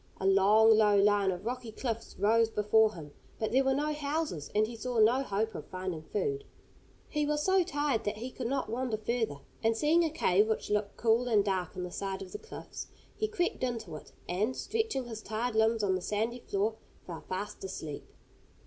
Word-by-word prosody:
A 190 - -3
long, 210 +3 +6
low 210 -1 +5
line 200 -1 +4
of 185 +2 -3
rocky 245 -1 -4
cliffs 230 0 -4
rose 225 +2 +3
before 215 0 +3
him, 150 -4 -9 0.3
but 220 - -2
there 265 +2 +4
were 265 0 +2
no 300 +2 0
houses, 290 - -2
and 215 +1 +4
he 230 +2 -7
saw 245 +1 -3
no 230 +5 +5
hope 220 -2 -1
of - - -7
finding 185 -3 -4
food. 415 - -2 0.6
He 300 - -1
was 295 0 0
so 380 +1 +4
tired 290 -8 0
that 205 - -1
he 245 +4 -5
could 250 -2 -4
not 270 +1 -1
wander 235 0 -2
further, 220 -9 -2 0.2
and 225 0 +2
seeing 315 +6 +4
a 325 - +1
cave 210 - +3
which 220 -1 -2
looked 210 -1 0
cool 235 +2 +2
and 210 -4 +3
dark 185 -4 -1
in 180 - -4
the 180 - -5
side 195 +1 -4
of 185 - -11
the - - -6
cliffs, 445 - -8 0.3
he 435 - 0
crept 365 -5 -1
into 230 -10 -3
it, 150 - -11 0.2
and, 210 +8 0
stretching 445 - -1
his 225 -2 -7
tired 225 +3 -2
limbs 220 0 +3
on 195 -2 +2
the 185 - -1
sandy 220 +6 -1
floor, 215 0 -1 0.3
fell 170 -3 -7
fast 190 +2 -4
asleep. 155 -6 -6
220 Hz, 205 wpm, -31 LUFS, 200-255 Hz, 0.6 s, long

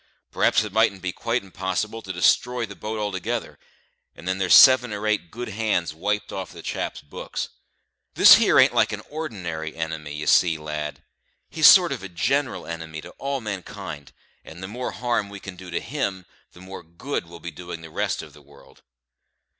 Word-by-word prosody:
Perhaps - - +3
it 105 -2 -7
mightn't 105 -4 +2
be 90 - -1
quite 115 +5 -2
onpossible 95 +4 -3
to 95 - -6
destr'y 115 +6 +2
the 100 - -10
boat 110 +2 -5
altogether, 105 +3 -3 0.6
and 85 - -11
then 95 +1 -1
there's 95 -2 +5
seven 130 -3 +8
or 105 +1 -4
eight 105 -5 0
good 120 +6 -6
hands 100 -6 -1
wiped 105 +6 -2
off 95 -2 -5
the - - -11
chap's - - -4
books. 75 - -6 0.7
This - - +10
here - - +3
ain't - - +6
like - - +3
a - - -4
ordinary 90 - -5
enemy, 80 -2 -5
you 75 - -5
see, 85 -3 +4
lad 75 -1 -5 0.5
he's - - +6
a - - +12
sort - - +4
of 95 -2 -6
general 135 +8 0
enemy 80 -1 -6
to - - -11
all 140 -1 -2
mankind; 95 - -7 0.3
and 85 +3 -11
the - - -4
more 125 +5 -4
harm 120 -4 -1
we 100 0 -9
can 95 -1 -9
do 90 0 -11
to 85 - -2
him, 100 -11 -3 0.3
the 90 - -15
more 95 +1 -9
good 85 - -5
we'll 85 0 -12
be 85 - -7
doing 90 -2 -8
the 80 -1 -11
rest - - -2
of - - -13
the 75 - -16
world." 70 -1 -20
95 Hz, 195 wpm, -24 LUFS, 85-110 Hz, 0.7 s, a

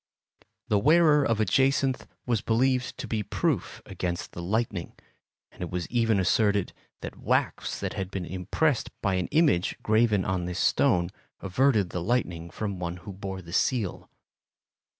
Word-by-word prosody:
The 105 - +3
wearer 150 +3 +5
of 115 -5 +1
a 110 - +3
jacinth 135 +5 +2 0.2
was 115 -4 0
believed 125 +2 +1
to - - -5
be 110 -2 -1
proof 105 - -2
against 85 -1 -4
the 85 - -7
lightning, 100 -1 -2 0.6
and - - -15
it 90 - -3
was 90 -1 -3
even 115 -4 +2
asserted 100 0 +2 0.3
that - - -7
wax - - 0
that - - -3
had 95 -1 -4
been 95 -2 -4
impressed 105 - 0
by 100 -3 +2
an 90 -1 0
image 150 - +2
graven 110 -3 +3
on 90 -2 -1
this 90 0 -4
stone 85 0 +2 0.3
averted 105 -1 +2
the 90 - -3
lightning 85 -6 -1
from 100 +2 -4
one 85 0 -4
who 100 - -6
bore 95 -1 -6
the 85 0 -10
seal. 110 -3 0
100 Hz, 160 wpm, -27 LUFS, 90-120 Hz, 0.6 s, wearer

